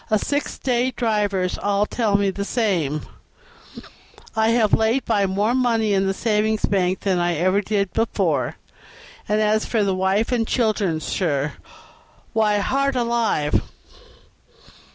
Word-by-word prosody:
The 215 - +3
six 285 +7 -2
day 250 -1 0
drivers 210 -6 -1
all 205 0 +1
tell 210 -3 +1
me 200 -1 +1
the 200 +1 -4
same, 180 - -1 0.7
and - - -11 0.5
I 220 0 +2
have 230 -2 +2
laid 225 +4 +2
by 205 -4 +1
more 205 +5 0
money 230 -4 +1
in 195 0 +1
the 195 - +1
savings 215 0 +1
bank 185 -2 0
than 190 -3 0
ever 175 +2 +1
I - - -1
did 200 -2 -1
before; 225 +1 0 0.7
and 210 +1 +2
as 215 0 +2
for 220 -3 0
the 195 -1 +1
wife 190 +5 0
and 230 -3 0
children, 205 -9 0
sir, 145 -5 -1 0.8
why, 215 -2 +2
heart 275 +6 0
alive! 235 -11 +1
210 Hz, 145 wpm, -22 LUFS, 190-225 Hz, 0.8 s, The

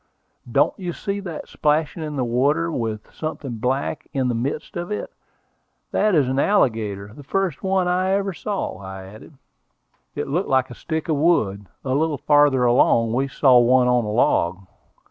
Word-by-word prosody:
"Don't - - +3
you 180 -2 -4
see 200 +2 -3
that 175 -6 -7
splashing 150 +2 0
in 150 -1 -4
the 130 - 0
water, 140 +8 +1
with 110 -6 -4
something 140 -6 -5
black 135 +6 -2
in 130 -3 0
the - - 0
midst 135 +6 -3
of 175 0 -4
it? 210 - -4 0.8
That 210 -3 +2
is 145 -5 +3
an 130 +1 0
alligator, 110 - +1
the 145 - -11
first 180 +2 -2
one 190 -1 +1
I 185 +1 +1
ever 195 -1 0
saw," 200 +3 -4
I 95 -1 -8
added. 105 +10 -13 0.8
It - - -3
looked 170 +8 -1
like 130 -1 +2
a - - -6
stick 160 +6 -4
of 155 -3 +1
wood. 105 - +1 0.2
A 130 - 0
little 150 +1 +1
farther 145 -2 +4
along 115 -1 +3
we 135 +3 +1
saw 130 -1 +5
one 125 +1 +4
on 125 -1 +3
a 105 - -4
log. 95 -4 +1
140 Hz, 180 wpm, -22 LUFS, 120-165 Hz, 0.8 s, saw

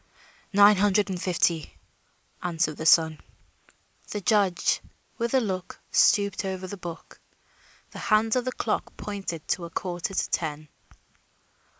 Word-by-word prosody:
"Nine 205 0 +7
hundred 205 0 +2
and 180 -1 -4
fifty," 170 -3 0 0.6
answered 165 -3 -1
the 160 - -2
son. 160 -2 +5 0.9
The 210 - -3
judge, 200 -3 +2 0.4
with 235 +2 0
a - - +6
last 240 - -2
look, 185 -2 -5
stooped 200 -1 +3
over 190 -1 -4
the 185 - -6
book. 170 -3 -9 0.7
The - - -9
hands 220 +1 +2
of 250 -1 0
the 255 - -1
clock 225 - -3
pointed 195 -6 -5
to 175 - -1
a - - -8
quarter 180 +2 -4
to - - 0
ten. 155 -2 -2
190 Hz, 140 wpm, -26 LUFS, 170-205 Hz, 0.9 s, Nine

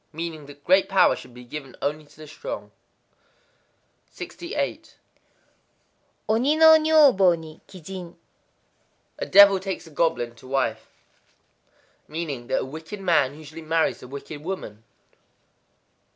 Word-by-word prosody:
Meaning 160 -2 -6
that 145 0 -14
great 190 +1 +3
power 195 - +4
should - - -12
be 125 - -11
given 135 +1 -9
only 150 +1 -3
to 145 0 -22
the 155 - -11
strong. 155 - -7 1.4
68.—Oni 285 - -5
no 320 0 +8
nyōbo 285 - +5
ni 160 -1 -12
kijin. 180 -1 -9 1.0
A - - -3
devil 200 -1 +7
takes 190 -1 -5
a 160 - -14
goblin 145 -7 0
to 130 - -15
wife. 115 -5 -1 1.2
Meaning 150 -7 -5
that - - 0
a - - -4
wicked 160 +9 -8
man 160 -7 +1
usually 155 +1 -11
marries 160 +1 0
a - - -10
wicked 145 +2 -9
woman. 135 - -6
160 Hz, 125 wpm, -24 LUFS, 145-190 Hz, 1.4 s, no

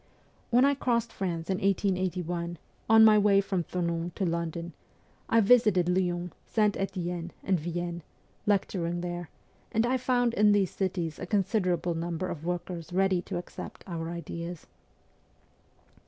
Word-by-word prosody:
When 245 +2 +5
I 280 - +4
crossed 235 -4 0
France 170 -4 -3
in 190 -1 -1
1881, 180 -3 -1 0.3
on 220 0 +8
my 215 -1 +7
way 200 -1 +5
from 195 -3 -1
Thonon 170 -1 -2
to 195 - -1
London, 170 0 -3 0.6
I 230 - +5
visited 210 -5 +5
Lyons, 180 -1 0 0.2
St. 210 -2 +2
Etienne, 175 -3 -3
and 190 -3 +1
Vienne, 175 +1 -4 0.5
lecturing 175 -4 0
there, 175 -1 -4 0.4
and 225 +1 +2
I 255 +2 +2
found 245 -2 +1
in 210 -1 +5
these 195 -3 +2
cities 175 -5 -2
a 185 - -5
considerable 185 -4 +1
number 170 +2 -3
of 155 - -6
workers 175 -1 -4
ready 190 0 +2
to - - -5
accept 175 - -8
our 165 -3 -4
ideas. 170 0 -6
180 Hz, 140 wpm, -29 LUFS, 170-205 Hz, 0.6 s, on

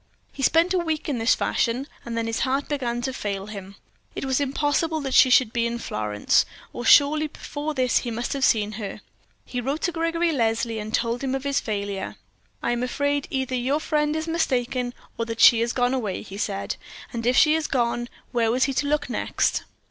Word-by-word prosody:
He 275 - -8
spent 330 +6 +3
a 370 - +2
week 320 -2 -2
in 275 -6 -1
this 225 +2 +4
fashion, 245 +4 0 0.2
and 235 -1 -5
then 230 - 0
his 225 0 -2
heart 270 +2 0
began 240 -5 -2
to 265 - -2
fail 200 -5 -3
him; 200 -2 -9 0.4
it - - -3
was 265 +1 +1
impossible 290 +3 0
that 270 -2 -3
she 260 - +7
should 250 -3 +4
be 235 -1 +1
in 235 0 -3
Florence, 105 - +1 0.3
or 240 - -5
surely 300 +4 +5
before 295 +1 -5
this 255 -2 +2
he 245 - -4
must 235 +1 -3
have 275 -1 -2
seen 215 -5 +3
her. 200 - -6 0.4
He 250 - -4
wrote 275 +6 -2
to 350 - +1
Gregory 330 0 0
Leslie 225 -4 0
and 215 +1 -5
told 235 +3 0
him 265 0 0
of 270 - -4
his 280 -1 +1
failure. 200 -2 -4 0.5
"I 235 - +1
am 240 0 -1
afraid 285 +3 -1
either 265 -1 -2
your 255 +4 +1
friend 300 -1 0
is 315 +1 -2
mistaken 250 -6 -1 0.2
or 230 - 0
that 230 0 -5
she 230 -1 +8
has 235 +1 +1
gone 245 0 +1
away," 215 -8 -2
he 200 -1 -9
said. 200 -2 -2 0.4
And 230 -1 -3
if 250 - +3
she 305 - +6
had 320 -1 0
gone, 240 -1 0 0.2
where 230 -2 +2
was 250 +3 +2
he 275 - +1
to 285 +2 0
look 295 0 0
next? - - 0
255 Hz, 215 wpm, -24 LUFS, 230-285 Hz, 0.5 s, she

